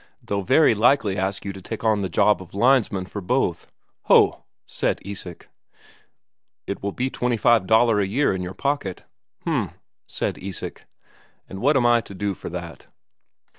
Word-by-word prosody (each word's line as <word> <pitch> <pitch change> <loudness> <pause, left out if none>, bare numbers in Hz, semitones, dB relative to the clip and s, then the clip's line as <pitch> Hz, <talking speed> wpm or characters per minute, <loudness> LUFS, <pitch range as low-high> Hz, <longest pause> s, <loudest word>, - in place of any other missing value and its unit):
They'll 100 0 -2
very 130 +7 +4
likely 110 -2 +3
ask 95 +1 -2
you 100 - -4
to 95 - -10
take 110 +4 -7
on 110 -2 +2
the 95 - -2
job 105 +4 +3
of 95 0 -13
linesman 115 -5 +2
for 100 +2 -7
both." 90 - -1 0.4
"Ho!" - - +4 0.2
said - - -1
Isak. 95 -4 -8 1.2
"It - - -5
will 100 - -2
be 130 +5 -2
twenty 125 -1 -1
five 110 -3 +3
Daler 110 -1 +4
a 100 - +1
year 125 +4 +1
in 95 - -3
your 90 +1 -6
pocket." 140 -10 -2 0.4
"H'm," - - -1 0.4
said - - -3
Isak. 95 -2 -7 0.6
"And 95 - -8
what 140 +3 +4
am 125 - +2
I 120 -1 +4
to 100 - -12
do 100 +1 -2
for - - -8
that?" 85 -1 -8
100 Hz, 170 wpm, -23 LUFS, 95-120 Hz, 1.2 s, very